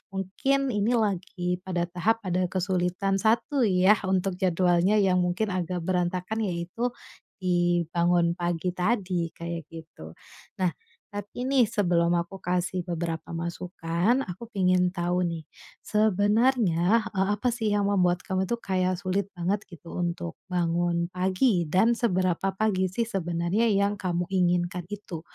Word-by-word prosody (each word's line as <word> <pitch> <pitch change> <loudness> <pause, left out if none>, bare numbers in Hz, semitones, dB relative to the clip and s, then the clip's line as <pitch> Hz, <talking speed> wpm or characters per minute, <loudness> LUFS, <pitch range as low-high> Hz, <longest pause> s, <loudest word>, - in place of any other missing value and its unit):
mungkin 265 +8 0
ini 215 +3 +1
lagi 180 -4 -1
pada 180 -2 -2
tahap 215 +5 0
ada 180 0 0
kesulitan 185 +1 0
satu 235 +4 +2
ya, 190 +2 +4
untuk 190 -1 0
jadwalnya 180 +2 +3
yang 190 -3 +3
mungkin 180 +4 0
agak 180 -1 -2
berantakan 180 +4 -1
yaitu 180 +7 -2 0.6
di 175 -1 +2
bangun 170 0 +3
pagi 175 0 -2
tadi, 180 -3 0
kayak 170 -2 -5
gitu. 160 - -11 0.4
Nah 185 -2 +1 0.4
tapi 205 +5 -5
nih 270 -1 +3
sebelum 175 -6 +2
aku 170 +3 -4
kasih 180 +1 -1
beberapa 170 -2 -4
masukan, 175 +7 -1
aku 195 +6 -8
pingin 185 -3 +2
tahu 175 0 -1
nih, 165 -3 -2 0.4
sebenarnya, 215 -1 +3
eee, 190 0 +1
apa 245 +2 0
sih 225 -3 -1
yang 205 -1 +1
membuat 185 -3 +2
kamu 190 0 -1
tuh 235 - 0
kayak 185 -3 0
sulit 185 +2 -2
banget 190 +4 0
gitu 170 -1 -11
untuk 170 - -3 0.2
bangun 170 -1 0
pagi, 185 - +1
dan 220 +7 +4
seberapa 185 -5 +1
pagi 190 -4 +1
sih 230 +6 -1
sebenarnya 185 +2 0
yang 200 0 +2
kamu 175 -3 -2
inginkan 175 -1 +1
itu? 200 -6 -6
185 Hz, 135 wpm, -27 LUFS, 175-205 Hz, 0.6 s, ya